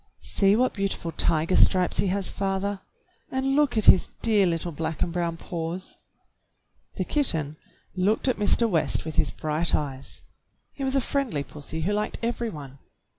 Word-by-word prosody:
"See 195 0 +3
what 255 +3 +2
beautiful 195 -4 -2
tiger 165 +2 +1
stripes 185 -2 +4
he - - +2
has, 195 0 -1
father, 195 0 -2 0.5
and 265 +1 0
look 290 -5 +2
at 215 - +2
his 185 - +7
dear 210 -4 +4
little 170 0 -1
black 160 +1 -2
and 170 - -3
brown 170 -1 -1
paws." 170 +2 -5 1.0
The - - -1
kitten 160 - 0 0.4
looked 200 +7 +1
at 255 - +1
Mr. 220 +3 +3
West 160 -9 0
with 160 - -6
his - - +3
bright 155 +2 0
eyes. 135 -3 -5 0.5
He 275 - -6
was 265 0 0
a 270 - +3
friendly 250 - -1
pussy 150 +3 -7
who 195 +6 0
liked 210 +1 -1
every 235 0 -1
one. 140 -6 -10
185 Hz, 170 wpm, -26 LUFS, 160-220 Hz, 1.0 s, his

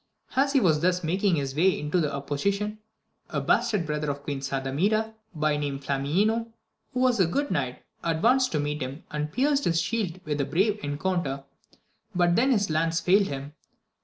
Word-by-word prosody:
As 275 +1 +3
he 275 - +5
was 160 -9 +3
thus 180 +2 +1
making 185 +3 +2
his 135 -3 -2
way 180 +1 +2
without 150 0 +1
opposition, 200 +10 -2 0.5
a - - -1
bastard 205 -7 +1
brother 150 -1 -2
of 140 0 -4
Queen 145 -2 -3
Sardamira, 145 +12 0 0.2
by 155 -1 +1
name 145 -2 -2
Flamineo, 180 +13 0 0.4
who 250 - -1
was 250 -3 +3
a 185 - +5
good 285 - -1
knight, 130 -3 -2 0.2
advanced 235 +11 +3
to 150 - +1
meet 150 +1 -2
him, 130 +4 -5
and 150 0 -3
pierced 280 - +1
his 165 -1 +2
shield 185 -1 -1
with 150 -1 -1
a - - 0
brave 195 +9 +1
encounter, 145 -2 -2 0.7
but 175 -1 +3
then 255 +4 +3
his 205 -9 +2
lance 165 +1 +1
failed 195 +3 +4
him. 140 +1 -6
165 Hz, 175 wpm, -27 LUFS, 145-210 Hz, 0.7 s, he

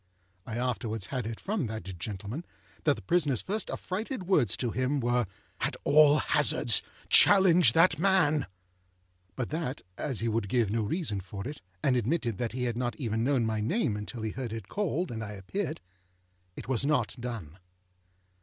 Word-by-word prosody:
I 115 - -4
afterwards 115 -4 -2
had 125 -2 -3
it 115 -1 -6
from 195 - -2
that 110 -2 -5 0.2
gentleman, 105 - -5 0.4
that 145 -2 +4
the 105 - -11
prisonerâs 145 - +1
first 210 +3 -3
affrighted 210 +4 -4
words 155 - +2
to 120 -3 -2
him 130 +4 0
were, 120 -2 +1 0.3
â_At - - -1
all 150 0 +6
hazards_, 135 -6 +4 0.3
challenge 180 - +7
that 165 -2 +4
man!â 160 - +3 0.9
But 125 +4 -4
that, 155 -4 -3 0.2
as 135 -7 -2
he 115 - -1
would 110 -3 -1
give 115 -3 +1
no 115 +1 0
reason 105 - -2
for 100 +3 -7
it, 145 +1 -7 0.2
and 130 - +3
admitted 120 - -1
that 120 -2 -2
he 125 0 -3
had 120 -2 -1
not 120 -2 -2
even 115 -2 -2
known 130 -2 +2
my 110 -1 -1
name 120 - 0
until 105 +2 -6
he 110 - -2
heard 125 -2 -5
it 110 -4 -6
called 180 -5 -2
and 115 -1 -4
I 105 -1 -6
appeared, 160 - -4 0.8
it - - -9
was 130 -1 0
not 150 +2 +1
done. 110 -9 -6
125 Hz, 175 wpm, -29 LUFS, 110-155 Hz, 0.9 s, challenge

